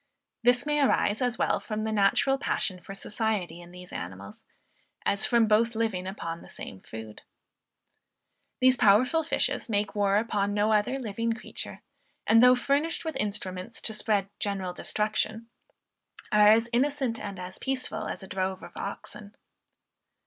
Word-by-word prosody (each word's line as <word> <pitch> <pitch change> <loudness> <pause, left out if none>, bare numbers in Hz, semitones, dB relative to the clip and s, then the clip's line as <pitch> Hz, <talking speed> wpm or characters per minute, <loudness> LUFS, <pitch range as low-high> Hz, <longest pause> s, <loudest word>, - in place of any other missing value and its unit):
This 245 +2 +3
may 295 0 +1
arise 220 -5 +2
as 245 -1 0
well - - +1
from 215 -1 -4
the 220 - -1
natural 215 +6 +3
passion 185 -8 -1
for 195 +2 -9
society 200 -5 -2
in 175 - -13
these 180 0 -12
animals, 95 +3 -7 0.6
as 200 +1 +2
from 235 -2 +4
both 225 +2 +3
living 215 -5 -1
upon 170 -4 -5
the - - -14
same 95 - -9
food. 110 -1 -9 1.4
These 255 0 +5
powerful 250 +11 +4
fishes 300 - 0
make 205 -1 0
war 200 -1 +2
upon 205 -2 0
no 210 +1 +3
other 215 +5 +2
living 230 -2 -2
creature; 225 - -8 0.4
and, 225 +1 +6
though 250 0 +8
furnished 285 +7 0
with 320 -3 -3
instruments 200 -1 -4
to 220 - -2
spread 210 -2 0
general 195 -3 -2
destruction, 215 +3 -2 0.8
are 210 0 +6
as 225 +1 +4
innocent 260 -2 +1
and 200 -2 -6
as 185 0 -7
peaceful 265 -1 -2
as - - -5
a - - -9
drove 190 0 -2
of - - -11
oxen. 205 -1 -7
215 Hz, 155 wpm, -28 LUFS, 195-235 Hz, 1.4 s, though